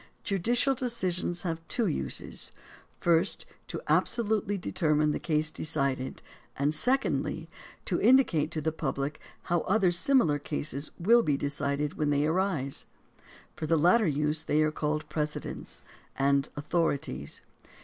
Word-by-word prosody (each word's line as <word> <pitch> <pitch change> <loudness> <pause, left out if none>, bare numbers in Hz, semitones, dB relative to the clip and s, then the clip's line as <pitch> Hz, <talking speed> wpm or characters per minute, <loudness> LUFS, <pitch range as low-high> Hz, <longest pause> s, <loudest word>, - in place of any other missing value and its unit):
Judicial 235 +7 +2
decisions 185 -8 -1
have 165 -2 -3
two 235 - +1
uses 165 - -1 0.2
— - - -27
first, 170 +2 +2 0.2
to - - -5
absolutely 210 -3 +1
de 180 - -5
termine 150 -2 +2
the - - -2
case 155 -1 0
decided, 140 -5 -2 0.3
and 145 +2 +1
secondly, 265 - 0 0.4
to - - -1
indicate 240 - +4
to 155 - -4
the 160 +2 0
public 145 -1 -3 0.2
how 175 0 +1
other 190 0 +2
similar 175 - +3
cases 145 0 0
will 230 +7 +5
be 145 -10 +1
decided 145 +1 -2
when 150 -1 +1
they 145 0 +2
arise. 160 -5 -1 0.7
For 155 - -4
the 165 +1 +3
latter 180 +7 +4
use, 150 +1 0
they 155 +1 +2
are 155 - +1
called 150 0 -2
"precedents" 150 0 -5 0.3
and 140 0 +2
"author 150 +1 +1
ities." 70 - -6
155 Hz, 140 wpm, -29 LUFS, 145-185 Hz, 0.7 s, will